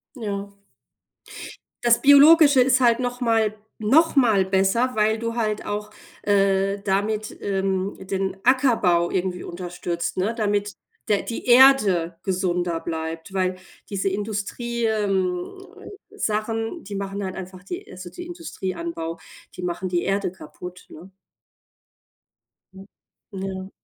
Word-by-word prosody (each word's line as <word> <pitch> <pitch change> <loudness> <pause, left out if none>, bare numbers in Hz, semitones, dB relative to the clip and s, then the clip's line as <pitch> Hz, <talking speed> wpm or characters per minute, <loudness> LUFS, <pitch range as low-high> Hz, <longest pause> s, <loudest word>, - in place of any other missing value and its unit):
Ja. 200 -4 -4 1.3
Das 235 -1 +4
Biologische 285 0 +7
ist 255 +1 +3
halt 235 -1 +4
nochmal 230 -4 0 0.3
nochmal 245 - +4
besser, 195 +6 +1
weil 215 +1 +2
du 230 0 -3
halt 215 -2 -1
auch, 210 0 -4 0.3
äh, 195 0 +2
damit, 210 +2 -1
ähm, 195 -1 -1
den 190 0 -3
Ackerbau 230 -10 +3
irgendwie 180 -1 -2
unterstützt, 175 -1 -4
ne, 195 +5 0
damit 205 -2 -1 0.3
der 205 -2 +2
die 230 - -6
Erde 215 -10 +5
gesunder 180 -3 -1
bleibt, 160 +2 -5
weil 185 -1 0 0.3
diese 195 -1 -1
Industrie 215 +4 -3
ähm, 195 - -1 0.5
Sachen, 225 - -2
die 200 0 -7
machen 200 +1 -4
halt 185 -1 -4
einfach 185 -1 -9
die 355 - -7
also, 185 -1 -9
die 350 - -9
Industrieanbau, 335 - -5 0.4
die - - -7
machen 180 +1 -3
die 175 -1 0
Erde 195 -1 0
kaputt, 180 +1 -11
ne? 170 +5 -12 1.6
Hm, 190 0 -12 0.5
ja. 190 -1 -5
200 Hz, 120 wpm, -23 LUFS, 185-230 Hz, 1.6 s, Biologische